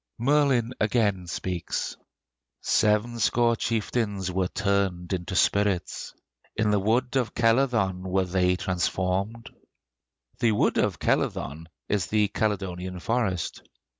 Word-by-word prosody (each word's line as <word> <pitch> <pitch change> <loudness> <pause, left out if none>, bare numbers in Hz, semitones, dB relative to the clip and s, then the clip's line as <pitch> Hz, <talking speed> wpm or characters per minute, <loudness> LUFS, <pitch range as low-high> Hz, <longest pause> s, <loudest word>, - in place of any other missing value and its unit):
Merlin 130 -2 +2
again 105 -4 +1
speaks: 90 0 -3 0.7
"Sevenscore 115 +2 +2
chieftains 105 -4 -1
Were 90 0 0
turned 100 -3 -1
into 90 +1 -3
spirits; 100 -2 +1 0.4
In 110 -1 +1
the 105 - +3
wood 120 +6 +1
of 125 -4 0
Celyddon 115 -6 +2
Were 95 0 0
they 90 0 +2
transformed. 95 +3 -2 0.9
The 115 -3 +3
wood 105 - +2
of - - +1
Celyddon 80 +4 -1 0.2
is 100 -3 0
the 105 -1 +2
Caledonian 95 -4 -2
Forest. 105 -4 -1
100 Hz, 105 wpm, -26 LUFS, 90-115 Hz, 0.9 s, the